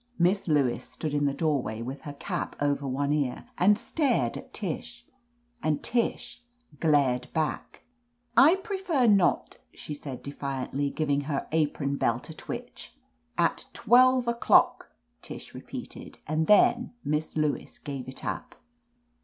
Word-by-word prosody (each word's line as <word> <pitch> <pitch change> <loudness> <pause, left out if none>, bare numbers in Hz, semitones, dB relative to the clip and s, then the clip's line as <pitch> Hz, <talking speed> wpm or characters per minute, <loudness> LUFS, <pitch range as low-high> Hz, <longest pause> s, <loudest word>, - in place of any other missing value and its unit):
Miss 185 +3 +2
Lewis 140 -6 +2
stood 155 -2 -5
in 145 -1 +2
the - - +1
doorway, 135 -9 -1
with 135 +4 -6
her - - -6
cap 140 - -4
over 145 -1 0
one 140 +2 0
ear, 140 -4 -1
and 205 +3 +5
stared 240 - 0
at - - -9
Tish, 240 +5 -5 0.6
and 155 -6 0
Tish 240 0 -1 0.4
glared 140 -6 +2
back. 155 -1 -3 0.5
"I 310 +7 +7
prefer 380 - 0
not," 200 -5 +3 0.2
she 150 - -7
said 140 -3 -7
defiantly, 140 0 -3
giving 145 -1 0
her 140 -2 -2
apron 145 -3 0
belt 120 +6 -1
a - - -8
twitch. 240 +7 -8 0.4
"At - - +1
twelve 255 0 +5
o'clock 235 0 +3 0.2
!" - - -46
Tish - - -9
repeated, - - -8
and 155 +1 0
then 240 +4 +4
Miss 150 +2 -1
Lewis 150 -1 -1
gave 140 -4 -6
it 130 - -7
up. - - -4
155 Hz, 140 wpm, -28 LUFS, 140-235 Hz, 0.6 s, I